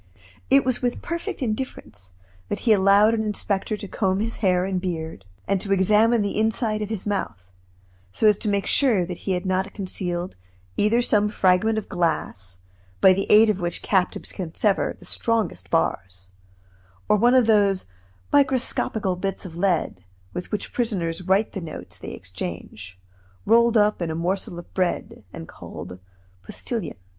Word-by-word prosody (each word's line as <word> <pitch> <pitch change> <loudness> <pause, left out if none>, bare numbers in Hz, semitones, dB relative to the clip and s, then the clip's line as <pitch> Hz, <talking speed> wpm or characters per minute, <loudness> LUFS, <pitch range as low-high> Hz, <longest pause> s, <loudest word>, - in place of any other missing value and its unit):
It 270 -1 +5
was 255 -1 0
with 245 -1 -2
perfect 335 -4 -4
indifference 215 - -4 0.4
that - - -3
he 225 - +4
allowed 200 +2 +5
an 225 - 0
inspector 210 0 -1
to 205 - -8
comb 190 -1 0
his 225 +2 -1
hair 185 -3 +2
and 190 -1 -2
beard, 160 - -5 0.2
and 195 -2 +1
to 200 - -5
examine 210 +4 +4
the 205 +1 -2
inside 220 0 0
of 210 - -3
his 220 -4 -4
mouth, 105 - -3 0.6
so 220 - -1
as 210 -1 +5
to - - -4
make 200 -1 0
sure 230 -10 +3
that 175 0 -6
he - - +3
had 180 +1 -2
not 190 +1 -1
concealed 180 - -3 0.4
either 230 +4 +2
some 210 -2 +2
fragment 200 +2 +2
of 220 - -3
glass, 95 - -2 0.4
by 190 - +7
the 195 +1 -2
aid 215 +2 +8
of 200 - -4
which 175 -1 -3
captives 190 -3 0
can 170 -4 -6
sever 205 -3 +1
the - - -16
strongest 215 - -1
bars, 95 0 -2 0.8
or - - +4
one 240 +4 +4
of 255 -2 +5
those 205 -3 +3 0.5
microscopical 255 -8 +2
bits 195 +2 -4
of 170 -3 -8
lead 170 - 0 0.3
with 180 - -6
which 210 -2 -4
prisoners 185 -9 -1
write 195 +3 +2
the 195 - -5
notes 160 -2 -8
they - - -7
exchange, 90 +1 -7 0.5
rolled 235 +2 +4
up 210 -2 +3
in 170 - -1
a 160 - -3
morsel 175 +1 -2
of 175 - -11
bread, 185 -2 -2
and - - -9
called 90 0 -9 0.4
"postilions." 210 - -4
195 Hz, 170 wpm, -24 LUFS, 175-220 Hz, 0.8 s, aid